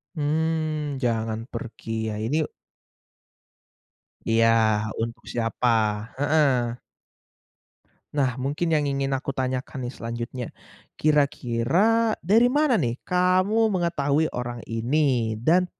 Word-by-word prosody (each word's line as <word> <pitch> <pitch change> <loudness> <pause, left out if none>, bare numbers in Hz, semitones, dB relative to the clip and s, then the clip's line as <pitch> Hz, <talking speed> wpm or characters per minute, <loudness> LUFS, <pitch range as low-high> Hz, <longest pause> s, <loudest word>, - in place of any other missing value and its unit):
Mmm, 155 -1 -1
jangan 115 -1 -1
pergi, 110 -3 -5
ya 105 - -3
ini 150 +6 0 1.8
Iya, 115 0 +4 0.5
untuk 115 +1 -4
siapa, 120 +1 0 0.5
heeh. 135 -5 +2 1.3
Nah, 135 -3 0
mungkin 145 +6 -1
yang 150 -1 +1
ingin 140 -1 -1
aku 135 0 -3
tanyakan 130 -1 -3
nih - - -9
selanjutnya. 120 +2 -5 0.5
Kira-kira 155 - +2
dari 225 +8 +4
mana 290 -5 +3
nih, 120 -5 -2
kamu 185 +5 +2
mengetahui 160 -3 +1
orang 120 -1 -5
ini 120 -1 +1
dan 180 +7 +4
140 Hz, 100 wpm, -25 LUFS, 120-160 Hz, 1.8 s, Iya